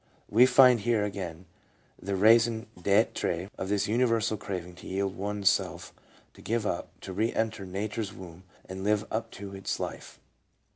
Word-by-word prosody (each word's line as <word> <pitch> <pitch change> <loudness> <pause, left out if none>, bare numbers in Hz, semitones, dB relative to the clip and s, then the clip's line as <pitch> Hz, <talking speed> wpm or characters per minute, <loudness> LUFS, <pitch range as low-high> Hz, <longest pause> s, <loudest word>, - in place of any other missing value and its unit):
We 120 +4 +7
find 125 -1 +7
here 110 0 +1
again 90 -4 -6 0.6
the 100 +1 -2
raison 115 +3 +4
d'Ure 95 -1 +1
of 95 - -3
this 100 -1 +1
universal 115 -1 +2
craving 90 -4 -6
to - - -11
yield 95 0 -2
one's 100 0 -3
self, - - +1 0.4
to - - -16
give 115 -1 -1
up, 85 - -2
to 95 - -7
re 110 +5 0
enter 110 -3 -2
Nature's 100 +2 -3
womb 90 -1 -11 0.2
and 95 +1 -6
live 105 +1 +1
of 110 +1 -2 0.3
its 95 0 -4
life. - - -6
105 Hz, 155 wpm, -28 LUFS, 95-110 Hz, 0.6 s, We